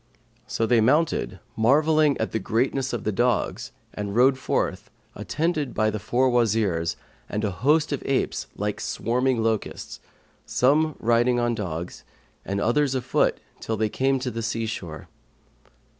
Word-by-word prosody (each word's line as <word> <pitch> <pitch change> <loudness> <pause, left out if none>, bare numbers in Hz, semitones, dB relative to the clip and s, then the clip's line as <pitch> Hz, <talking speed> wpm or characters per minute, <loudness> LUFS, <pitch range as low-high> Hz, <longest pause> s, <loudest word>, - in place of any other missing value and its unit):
So 125 -2 0
they 115 0 +3
mounted, 135 - +1 0.2
marvelling 150 +5 +3
at 110 - -2
the 110 - -1
greatness 130 +5 0
of 120 -3 -3
the 110 - 0
dogs, 120 +2 0 0.2
and 100 -1 -4
rode 130 +3 +5
forth, 130 - -2 0.2
attended 155 -3 -2
by 110 0 +2
the 110 - -4
four 125 +6 +1
Wazirs 105 -8 +1 0.3
and 105 +1 -2
a 105 - 0
host 145 - +2
of 140 - -2
apes 135 - -1
like - - -3
swarming 125 0 0
locusts, 110 -2 -2 0.4
some 150 +4 +2
riding 120 +2 +2
on 120 0 +1
dogs 90 -6 -5 0.4
and 100 +1 -2
others 135 +5 +1
afoot 130 0 +1 0.2
till 110 - -3
they 110 -1 +1
came 135 +4 +1
to 125 -1 -2
the 115 0 -4
sea 115 0 -2
shore. 85 -8 -6
120 Hz, 150 wpm, -25 LUFS, 110-135 Hz, 0.4 s, rode